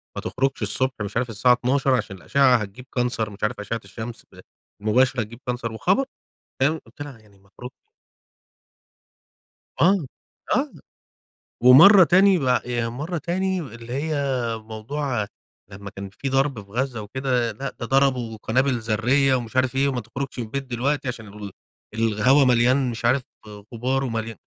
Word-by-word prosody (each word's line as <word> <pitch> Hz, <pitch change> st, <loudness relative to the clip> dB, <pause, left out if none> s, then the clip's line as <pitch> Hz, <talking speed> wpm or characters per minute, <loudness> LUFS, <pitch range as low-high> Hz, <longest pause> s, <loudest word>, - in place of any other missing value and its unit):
"ما -, -, -4 dB
تخرجش 135 Hz, -1 st, -1 dB
الصبح، 130 Hz, +6 st, 0 dB
مش 100 Hz, +2 st, -4 dB
عارف 125 Hz, 0 st, -1 dB
الساعة 115 Hz, +3 st, +3 dB
12:00 130 Hz, +2 st, +1 dB
عشان 105 Hz, -5 st, -3 dB
الأشعة 130 Hz, +7 st, +3 dB
هتجيب 110 Hz, +3 st, -4 dB
Cancer 120 Hz, -3 st, 0 dB
مش 100 Hz, -, -12 dB
عارف 105 Hz, +1 st, -1 dB
أشعة 115 Hz, +3 st, -4 dB
الشمس 110 Hz, +4 st, -8 dB
ز -, -, -15 dB, 0.4 s
المباشرة 125 Hz, +4 st, +2 dB
هتجيب 115 Hz, +2 st, -8 dB
Cancer." 120 Hz, -2 st, -3 dB
وخبر 185 Hz, -, +1 dB, 0.6 s
"فاهم؟ 155 Hz, +4 st, +2 dB
قُلت 115 Hz, -, -21 dB
لها: 140 Hz, -5 st, -9 dB
"يعني 105 Hz, -2 st, -23 dB
ما 100 Hz, +1 st, -27 dB
اخرجش؟" 125 Hz, +4 st, -10 dB, 2.1 s
آه، 185 Hz, -2 st, +4 dB, 0.5 s
آه، 275 Hz, +2 st, 0 dB, 0.9 s
ومَرّة 165 Hz, +10 st, +9 dB
تاني 185 Hz, +2 st, +5 dB
ب -, -, -4 dB, 0.2 s
يعني 120 Hz, -1 st, -2 dB
مَرّة 155 Hz, +8 st, -4 dB
تاني 185 Hz, +3 st, -1 dB
اللي 120 Hz, -5 st, -9 dB
هي 150 Hz, +4 st, -2 dB, 0.4 s
موضوع، 110 Hz, +2 st, -4 dB, 0.4 s
لمّا 100 Hz, +1 st, -9 dB
كان 100 Hz, 0 st, -8 dB
في 135 Hz, +7 st, -5 dB
ضرب 135 Hz, -3 st, +1 dB
في 100 Hz, -, -24 dB
غزة 120 Hz, 0 st, -2 dB
وكده، 125 Hz, +1 st, -1 dB
لأ، 135 Hz, +6 st, -5 dB
ده 115 Hz, -, -3 dB
ضربوا 130 Hz, -4 st, +1 dB
قنابل 130 Hz, +2 st, +1 dB
ذرية 125 Hz, +5 st, +2 dB
ومش 120 Hz, -1 st, -4 dB
عارف 130 Hz, 0 st, +2 dB
إيه 135 Hz, +1 st, +2 dB
وما 130 Hz, -3 st, -2 dB
تخرجش 125 Hz, +5 st, -6 dB
من 120 Hz, -, -2 dB
البيت 135 Hz, +5 st, -4 dB
دلوقتي 130 Hz, +3 st, -2 dB
عشان 120 Hz, -3 st, -6 dB
ال 100 Hz, 0 st, -9 dB, 0.4 s
الهوا 115 Hz, +5 st, +3 dB
مليان 125 Hz, +1 st, +3 dB
مش 115 Hz, 0 st, -7 dB
عارف 125 Hz, +3 st, +3 dB, 0.5 s
غبار 130 Hz, +3 st, -1 dB
ومليا 115 Hz, -3 st, -4 dB
125 Hz, 160 wpm, -23 LUFS, 110-135 Hz, 2.1 s, ومَرّة